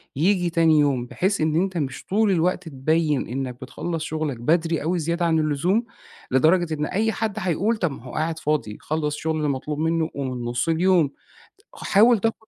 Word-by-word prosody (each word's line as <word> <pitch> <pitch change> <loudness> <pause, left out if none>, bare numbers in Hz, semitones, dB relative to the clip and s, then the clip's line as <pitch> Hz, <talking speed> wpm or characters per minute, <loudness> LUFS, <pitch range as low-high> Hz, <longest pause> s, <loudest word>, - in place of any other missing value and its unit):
ييجي 180 +4 +2
تاني 165 -2 +4
يوم؟ 135 -4 +1
بحيث 190 +10 -1
إن 155 0 +1
أنت 185 +2 0
مش 135 -4 -4
طول 210 +1 +2
الوقت 180 0 0
تبين 150 +1 0
إنك 125 +1 -5
بتخلّص 160 +5 -4
شغلك 155 -4 -3
بدري 165 +5 +1
أوي 175 +3 0
زيادة 170 +2 -1
عن 160 -1 +2
اللزوم، 155 - +1 0.5
لدرجة 160 +5 +3
إن 150 -1 -1
أي 220 +7 0
حد 220 -1 -3
حيقول: 195 +5 0
طَب 175 -6 0
ما 135 - -10
هو 125 - -10
قاعد 160 +1 -2
فاضي، 150 -9 -1
خلّص 150 -1 -2
الشغل 155 0 -2
المطلوب 145 +1 -2
منه 160 0 0
ومن 130 -3 -4
نُص 120 +6 -1
اليوم. 170 -2 +3 0.6
حاول 225 +3 +4
تاخد 225 +1 -2
160 Hz, 180 wpm, -23 LUFS, 145-180 Hz, 0.6 s, تاني